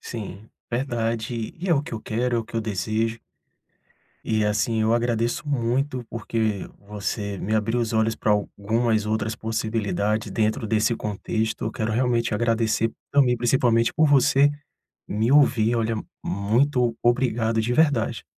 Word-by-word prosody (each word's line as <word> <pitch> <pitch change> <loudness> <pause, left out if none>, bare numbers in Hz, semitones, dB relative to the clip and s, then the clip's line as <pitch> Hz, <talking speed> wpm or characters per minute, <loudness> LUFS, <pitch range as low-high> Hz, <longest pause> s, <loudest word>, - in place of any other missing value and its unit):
Sim, 105 -2 -8 0.2
verdade, 115 -2 -2
e 180 +3 -5
é 170 - +5
o 140 - +1
que - - -10
eu 110 - -5
quero, 120 +3 -1
é - - +2
o 115 - -8
que - - -17
eu - - +1
desejo 110 +2 -2 1.0
e, 110 -1 +1
assim, 110 +2 +1
eu 110 +1 +2
agradeço 120 +4 0
muito 125 0 -1
porque 110 -3 -2 0.2
você 100 -1 -3
me 105 +4 -2
abriu 110 +2 +1
os 115 -1 -2
olhos 110 0 +1
pra 105 - +1
algumas 110 +2 0
outras 110 0 -1
possibilidade 110 -1 -1
dentro 110 0 0
desse 110 +2 +2
contexto, 110 +2 -2
eu - - -1
quero 110 -2 -2
realmente 120 -2 +1
agradecer 115 0 +1 0.2
também 130 -4 +4
principalmente 120 -1 +2
por 155 -1 +4
você 140 +1 +5 0.6
me 110 +4 0
ouvir, 120 -5 +4
olha, 115 0 0 0.3
muito 120 +4 +1
obrigado 120 -2 +1
de 120 +2 -1
verdade. 125 -6 +2
115 Hz, 150 wpm, -24 LUFS, 110-120 Hz, 1.0 s, é